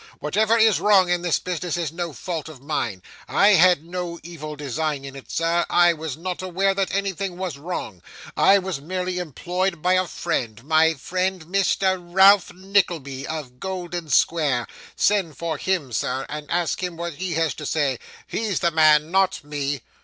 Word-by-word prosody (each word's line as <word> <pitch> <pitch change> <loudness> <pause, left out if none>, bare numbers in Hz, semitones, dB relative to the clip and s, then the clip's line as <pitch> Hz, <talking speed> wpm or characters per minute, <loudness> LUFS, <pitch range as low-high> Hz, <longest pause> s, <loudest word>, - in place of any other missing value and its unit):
Whatever 215 +8 +1
is 220 -2 +4
wrong 195 -3 +4
in 175 -1 +1
this 175 -2 +1
business 180 -1 -3
is 165 -4 -2
no 170 0 -4
fault 160 +1 -5
of 155 -5 -11
mine. 120 -10 -3 0.2
I 200 - +4
had 180 -5 +5
no 175 0 -5
evil 155 -3 -7
design 145 0 -3
in 135 0 -8
it, 135 - -11
sir. 165 +1 +1
I 175 -1 +5
was 155 -3 -6
not 180 +2 -4
aware 185 +2 +1
that 195 -1 -1
anything 195 -2 -2
was 180 -7 -4
wrong. 140 - -5 0.3
I 200 - +6
was 185 -6 -3
merely 180 +3 -3
employed 175 +2 -3
by 180 +1 +3
a 185 0 +2
friend, 115 -7 -3
my 160 +2 +3
friend 185 +4 -2
Mr. 190 +1 +1
Ralph 190 +3 +5
Nickleby, 175 -8 -1
of 140 -6 -6
Golden 175 -3 -5
Square. 140 -4 +2 0.3
Send 190 -9 +1
for 165 -1 -3
him, 180 -9 -1
sir, 130 +3 -2
and 150 0 -6
ask 175 0 0
him 180 -2 -4
what 170 0 -4
he 185 -1 -3
has 165 -1 +1
to 150 - -7
say; 140 -5 0 0.3
he's 215 -4 -2
the 170 - +2
man; 155 0 +4
not 190 -2 +2
me!" 145 -2 -3
170 Hz, 175 wpm, -23 LUFS, 150-185 Hz, 0.3 s, I